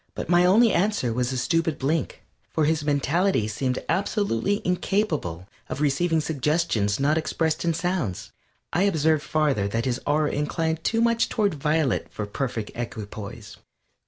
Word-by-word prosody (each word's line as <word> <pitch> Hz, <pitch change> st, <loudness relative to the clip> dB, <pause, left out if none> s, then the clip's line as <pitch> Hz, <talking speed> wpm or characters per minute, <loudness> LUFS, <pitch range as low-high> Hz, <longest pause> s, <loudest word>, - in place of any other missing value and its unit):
But -, -, -5 dB
my 175 Hz, 0 st, +5 dB
only 220 Hz, +5 st, +5 dB
answer 185 Hz, -, +1 dB
was 125 Hz, +1 st, 0 dB
a 130 Hz, -, -2 dB
stupid 165 Hz, +4 st, 0 dB
blink, 150 Hz, +4 st, -2 dB, 0.3 s
for 155 Hz, -, +1 dB
his 155 Hz, 0 st, +1 dB
mentality 145 Hz, -, +1 dB
seemed 125 Hz, +4 st, -1 dB
absolutely 200 Hz, -, 0 dB
incapable 175 Hz, -, -1 dB, 0.2 s
of -, -, -4 dB
receiving 155 Hz, +3 st, +2 dB
suggestions 150 Hz, -9 st, 0 dB
not 150 Hz, +3 st, +2 dB
expressed 160 Hz, 0 st, -1 dB
in 165 Hz, -2 st, +1 dB
sounds. 175 Hz, -, -2 dB, 0.4 s
I 175 Hz, -, +2 dB
observed 160 Hz, -6 st, +2 dB
farther 150 Hz, -9 st, +1 dB
that 115 Hz, +3 st, -2 dB
his 130 Hz, 0 st, -1 dB
aura 150 Hz, +1 st, +2 dB
inclined 160 Hz, +2 st, -1 dB
too 225 Hz, 0 st, +1 dB
much 230 Hz, 0 st, +2 dB
toward 205 Hz, -4 st, +1 dB
violet 150 Hz, -2 st, 0 dB
for 105 Hz, -, -4 dB
perfect 115 Hz, 0 st, -3 dB
equipoise. 110 Hz, -1 st, -7 dB
155 Hz, 150 wpm, -25 LUFS, 125-175 Hz, 0.4 s, my